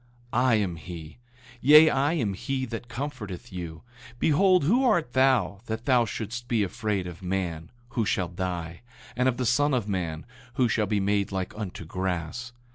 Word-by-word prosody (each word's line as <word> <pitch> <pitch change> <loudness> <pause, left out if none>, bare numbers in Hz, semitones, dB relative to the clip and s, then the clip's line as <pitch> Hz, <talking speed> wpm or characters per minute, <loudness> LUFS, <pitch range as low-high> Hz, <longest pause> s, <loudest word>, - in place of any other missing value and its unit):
8:12 120 - +3
I 130 -1 +4
am 100 -5 0
he; 80 0 -9 0.4
yea, 150 +4 +8
I 140 +4 +2
am 115 -12 0
he 130 +7 -2
that 115 0 -6
comforteth 120 -6 -6
you. 85 -2 -6 0.3
Behold, 180 +6 +4
who 235 - +3
art 175 - +2
thou, 130 -8 +3
that 110 +1 -4
thou 125 -3 +4
shouldst 120 +3 -5
be 115 -4 +2
afraid 105 -1 -2
of 90 +1 -8
man, 90 -3 -3 0.2
who 115 - 0
shall 100 -3 0
die, 85 -2 -4 0.3
and 125 +1 +3
of 120 - -2
the 125 - -1
son 145 +4 +3
of 115 -5 -1
man, 85 -5 -3 0.3
who 125 -2 +3
shall 105 -1 +1
be 105 0 +1
made 100 +1 +1
like 95 -1 -3
unto 100 -5 -6
grass? 90 +7 -3
110 Hz, 180 wpm, -27 LUFS, 90-130 Hz, 0.4 s, yea